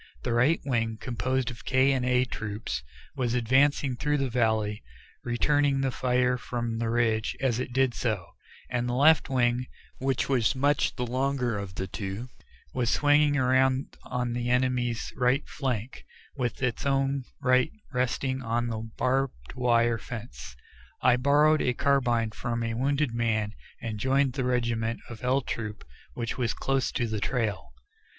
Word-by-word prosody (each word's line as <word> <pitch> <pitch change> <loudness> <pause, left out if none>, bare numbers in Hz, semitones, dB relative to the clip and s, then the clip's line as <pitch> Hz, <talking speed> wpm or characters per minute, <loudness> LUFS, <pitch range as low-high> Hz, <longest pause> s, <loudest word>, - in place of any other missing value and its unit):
The - - -1
right 130 +8 +3
wing, 115 -4 0
composed 130 +2 -1
of 120 - -11
K 130 +1 +3
and 130 -2 0
A 125 0 +3
Troops, 105 - -4 0.3
was 125 -2 0
advancing 130 +2 +3
through 150 +4 0
the 135 -3 -1
valley, 110 -3 +1 0.4
returning 140 +3 +2
the 135 -1 0
fire 125 0 +1
from 120 0 -3
the 115 -1 -1
ridge 115 -2 +1
as 125 -3 +1
it 125 - -3
did 130 0 +2
so, 110 -8 -1 0.4
and 125 0 -1
the 120 - -1
left 155 +4 +5
wing, 125 -1 +1 0.3
which 135 -1 0
was 125 -6 +2
much 145 +2 +2
the 125 - -2
longer 130 -1 0
of 100 -3 -5
the 95 - -2
two, 100 +5 -5 0.4
was 120 -2 0
swinging 145 +1 +4
around 130 0 +2
on 125 -1 -2
the 120 0 -2
enemy's 125 -2 0
right 125 +3 +1
flank, 130 -4 -3 0.3
with 125 -1 -2
its 125 -2 -1
own 135 -1 +1 0.2
right 130 +3 +3 0.2
resting 130 +1 -1
on 120 0 -1
the 110 0 -4
barbed 130 - -1
wire 120 -2 +2
fence. 115 - -8 0.5
I 120 - +6
borrowed 145 +4 +4
a 125 - +1
carbine 120 -6 +2
from 115 +1 -3
a 115 0 -2
wounded 140 +2 0
man, 110 -3 0 0.3
and 110 -2 -5
joined 135 +2 +2
the 130 -1 -2
remnant 115 -2 0
of 110 -1 -9
L 130 +2 +2
Troop 105 -5 -5 0.3
which 120 +1 -3
was 115 -2 0
close 135 -1 0
to 120 - 0
the 110 -2 -2
trail. 110 - -2
125 Hz, 160 wpm, -28 LUFS, 115-135 Hz, 0.5 s, I